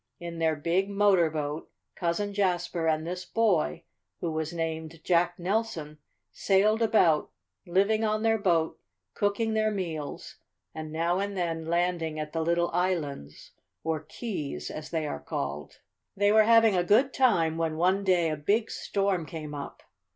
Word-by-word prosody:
In 170 Hz, -1 st, -6 dB
their 160 Hz, -1 st, +2 dB
big 175 Hz, +6 st, 0 dB
motor 200 Hz, -4 st, +4 dB
boat 150 Hz, 0 st, -4 dB, 0.2 s
Cousin 190 Hz, +4 st, -2 dB
Jasper 175 Hz, -4 st, 0 dB
and 155 Hz, 0 st, +1 dB
this 180 Hz, +2 st, -4 dB
boy, 185 Hz, -, +1 dB, 0.4 s
who 170 Hz, -, -2 dB
was 160 Hz, 0 st, -2 dB
named 160 Hz, -1 st, -4 dB
Jack 175 Hz, 0 st, +2 dB
Nelson, 175 Hz, -6 st, -2 dB, 0.3 s
sailed 210 Hz, +3 st, +2 dB
about, 195 Hz, -9 st, +3 dB, 0.4 s
living 200 Hz, +5 st, +2 dB
on 215 Hz, 0 st, 0 dB
their 225 Hz, 0 st, +3 dB
boat, 170 Hz, -5 st, +1 dB, 0.3 s
cooking 210 Hz, +2 st, 0 dB
their 215 Hz, 0 st, +2 dB
meals, 170 Hz, -8 st, -5 dB, 0.4 s
and 155 Hz, -1 st, -6 dB
now 170 Hz, +3 st, 0 dB
and 200 Hz, 0 st, -3 dB
then 165 Hz, -2 st, -2 dB
landing 170 Hz, -2 st, 0 dB
at 150 Hz, 0 st, -5 dB
the 165 Hz, -, -1 dB
little 170 Hz, +1 st, +1 dB
islands, 160 Hz, -, -2 dB, 0.3 s
or 160 Hz, -1 st, -1 dB
keys, 150 Hz, -, -5 dB
as 155 Hz, 0 st, -7 dB
they 160 Hz, -2 st, -1 dB
are 75 Hz, -, -4 dB
called. 70 Hz, 0 st, -5 dB, 0.4 s
"They 205 Hz, +1 st, +4 dB
were 215 Hz, 0 st, +6 dB
having 225 Hz, -2 st, +5 dB
a 180 Hz, -, +2 dB
good 240 Hz, +9 st, +3 dB
time 175 Hz, -12 st, +3 dB
when 160 Hz, -1 st, -1 dB
one 185 Hz, +4 st, +2 dB
day 175 Hz, -4 st, +2 dB
a -, -, -1 dB
big 210 Hz, +9 st, 0 dB
storm 195 Hz, -5 st, -1 dB
came 155 Hz, -1 st, -7 dB
up. 145 Hz, -1 st, -7 dB
175 Hz, 160 wpm, -28 LUFS, 160-200 Hz, 0.4 s, were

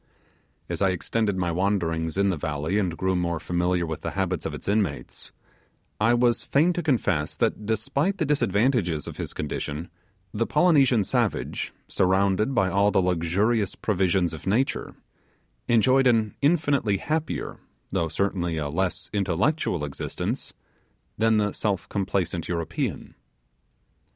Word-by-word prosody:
As -, -, -4 dB
I 100 Hz, -, +4 dB
extended 100 Hz, +3 st, -1 dB
my 90 Hz, -2 st, 0 dB
wanderings 85 Hz, -3 st, 0 dB
in 100 Hz, 0 st, +3 dB
the -, -, -1 dB
valley 75 Hz, +5 st, -1 dB
and 90 Hz, -5 st, -1 dB
grew 95 Hz, 0 st, 0 dB
more 85 Hz, -2 st, -1 dB
familiar 90 Hz, +1 st, 0 dB
with 80 Hz, -1 st, -5 dB
the -, -, -3 dB
habits 95 Hz, -3 st, -1 dB
of -, -, -6 dB
its -, -, -10 dB
inmates, 100 Hz, 0 st, -2 dB, 0.7 s
I 115 Hz, +3 st, +4 dB
was 120 Hz, -1 st, +2 dB
fain 160 Hz, +6 st, +3 dB
to 175 Hz, -, -2 dB
confess 100 Hz, -, 0 dB
that, 105 Hz, -, -1 dB
despite 135 Hz, -, 0 dB
the 160 Hz, -, 0 dB
disadvantages 110 Hz, -, +1 dB
of -, -, -8 dB
his -, -, -4 dB
condition, 75 Hz, +2 st, -4 dB, 0.4 s
the 115 Hz, +2 st, 0 dB
Polynesian 140 Hz, -, +4 dB
savage, -, -, -1 dB, 0.2 s
surrounded 95 Hz, +6 st, +2 dB
by 95 Hz, -, +3 dB
all 100 Hz, +2 st, +3 dB
the 105 Hz, -, +2 dB
luxurious 95 Hz, +5 st, +1 dB
provisions 95 Hz, -4 st, +1 dB
of 80 Hz, +2 st, -8 dB
nature, 115 Hz, +8 st, 0 dB, 0.7 s
enjoyed 130 Hz, +3 st, +4 dB
an 110 Hz, -3 st, +2 dB
infinitely 140 Hz, -, +2 dB
happier, 155 Hz, +7 st, -3 dB, 0.3 s
though 85 Hz, -4 st, 0 dB
certainly 90 Hz, -1 st, -1 dB
a 75 Hz, -2 st, -2 dB
less 90 Hz, +2 st, -2 dB
intellectual 100 Hz, -, 0 dB
existence 70 Hz, -, -4 dB, 0.6 s
than 110 Hz, 0 st, +4 dB
the 105 Hz, -1 st, +1 dB
self 100 Hz, -4 st, -2 dB
complacent 95 Hz, -4 st, -1 dB
European. 85 Hz, -2 st, -3 dB
100 Hz, 140 wpm, -25 LUFS, 85-115 Hz, 0.7 s, I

